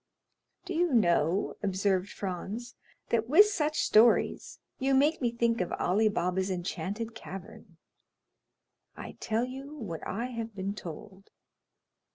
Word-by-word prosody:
"Do 370 Hz, -, -4 dB
you 340 Hz, -4 st, +2 dB
know," 175 Hz, -3 st, +2 dB
observed 195 Hz, -1 st, 0 dB
Franz, 205 Hz, +5 st, -5 dB, 0.4 s
"that 230 Hz, 0 st, 0 dB
with 340 Hz, +9 st, +8 dB
such 310 Hz, -7 st, 0 dB
stories 225 Hz, +2 st, +3 dB, 0.2 s
you 270 Hz, 0 st, +2 dB
make 295 Hz, +4 st, +3 dB
me 240 Hz, -2 st, +1 dB
think 235 Hz, -2 st, +1 dB
of 180 Hz, -, -2 dB
Ali 215 Hz, +5 st, +2 dB
Baba's 185 Hz, 0 st, -1 dB
enchanted 190 Hz, +5 st, -3 dB
cavern?" 190 Hz, -4 st, -10 dB, 1.2 s
"I -, -, -7 dB
tell 225 Hz, +2 st, 0 dB
you 270 Hz, +3 st, -8 dB
what 195 Hz, -, -6 dB
I 230 Hz, +5 st, -2 dB
have 230 Hz, -2 st, -5 dB
been 195 Hz, 0 st, -3 dB
told." 190 Hz, +1 st, -10 dB
215 Hz, 130 wpm, -29 LUFS, 190-245 Hz, 1.2 s, with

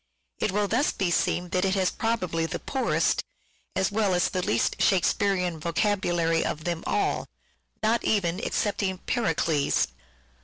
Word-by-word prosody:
It 210 Hz, -, 0 dB
will 205 Hz, +1 st, +1 dB
thus 250 Hz, +8 st, +2 dB
be 185 Hz, -3 st, -1 dB
seen 175 Hz, +1 st, 0 dB
that 180 Hz, +1 st, 0 dB
it 190 Hz, 0 st, +2 dB
has 190 Hz, -2 st, +2 dB
probably 185 Hz, -8 st, -1 dB
the -, -, -3 dB
poorest, 265 Hz, -2 st, 0 dB, 0.5 s
as 190 Hz, -, +1 dB
well 205 Hz, -3 st, +1 dB
as 175 Hz, -, +2 dB
the 185 Hz, -, -1 dB
least 115 Hz, -9 st, 0 dB
Shakespearean 185 Hz, -2 st, +2 dB
vocabulary 170 Hz, -1 st, +1 dB
of 155 Hz, -, -3 dB
them 170 Hz, -1 st, -2 dB
all; -, -, 0 dB, 0.6 s
not 225 Hz, +2 st, +2 dB
even 195 Hz, -1 st, 0 dB
excepting 200 Hz, -3 st, -1 dB
" -, -, -33 dB
Pericles." 160 Hz, -, +1 dB
185 Hz, 150 wpm, -26 LUFS, 170-205 Hz, 0.6 s, thus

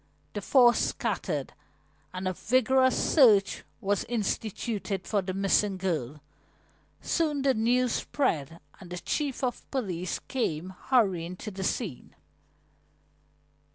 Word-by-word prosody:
The 205 Hz, -, -4 dB
four 245 Hz, +3 st, +6 dB
scattered, -, -, -2 dB, 0.6 s
and 185 Hz, +1 st, -4 dB
a 185 Hz, -, 0 dB
vigorous 260 Hz, +5 st, +3 dB
search 215 Hz, -10 st, +4 dB, 0.2 s
was 200 Hz, 0 st, 0 dB
instituted 210 Hz, -3 st, -2 dB
for 205 Hz, -2 st, +1 dB
the 185 Hz, 0 st, -4 dB
missing 195 Hz, 0 st, +2 dB
girl. 155 Hz, -7 st, -3 dB, 0.8 s
Soon 300 Hz, -4 st, 0 dB
the 270 Hz, -1 st, +4 dB
news 245 Hz, +2 st, +2 dB
spread 165 Hz, -, -1 dB, 0.2 s
and 180 Hz, -, -12 dB
the 180 Hz, -, -5 dB
chief 275 Hz, -, -2 dB
of 245 Hz, -2 st, -3 dB
police 185 Hz, -9 st, -2 dB
came 185 Hz, -, -3 dB, 0.2 s
hurrying 185 Hz, -9 st, +2 dB
to 210 Hz, -, -7 dB
the 190 Hz, 0 st, -5 dB
scene. 185 Hz, -, -3 dB
205 Hz, 120 wpm, -28 LUFS, 185-250 Hz, 0.8 s, four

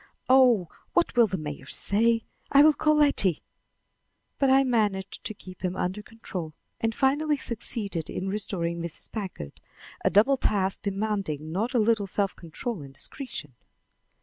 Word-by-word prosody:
Oh, 250 Hz, -8 st, +5 dB, 0.3 s
what 345 Hz, -6 st, +2 dB
will 235 Hz, -2 st, +6 dB
the 190 Hz, -1 st, -3 dB
mayor 150 Hz, -4 st, -7 dB
say? 225 Hz, +6 st, +2 dB, 0.3 s
I 280 Hz, +1 st, +7 dB
will 310 Hz, 0 st, +7 dB
call 305 Hz, +1 st, +2 dB
Letty." 280 Hz, -, +3 dB, 1.0 s
But 275 Hz, -, +3 dB
I 270 Hz, +1 st, +6 dB
managed 210 Hz, -7 st, -1 dB
to 215 Hz, -, -3 dB
keep 185 Hz, -1 st, -13 dB
him 185 Hz, 0 st, -1 dB
under 185 Hz, +3 st, -2 dB
control 185 Hz, -8 st, -7 dB, 0.2 s
and 225 Hz, -1 st, -1 dB
finally 290 Hz, +3 st, +2 dB
succeeded 210 Hz, -, -4 dB
in 190 Hz, -, -4 dB
restoring 175 Hz, -4 st, -2 dB
Mrs. 170 Hz, -1 st, -6 dB
Packard 185 Hz, -, -6 dB, 0.4 s
a -, -, +4 dB
double 225 Hz, +8 st, +4 dB
task 195 Hz, -5 st, 0 dB
demanding 195 Hz, -7 st, -2 dB
not 225 Hz, +9 st, -2 dB
a -, -, +5 dB
little 215 Hz, -2 st, +2 dB
self 195 Hz, 0 st, 0 dB
control 175 Hz, +4 st, -5 dB
and 135 Hz, -1 st, -11 dB
discretion. 150 Hz, -, -4 dB
205 Hz, 150 wpm, -27 LUFS, 180-245 Hz, 1.0 s, I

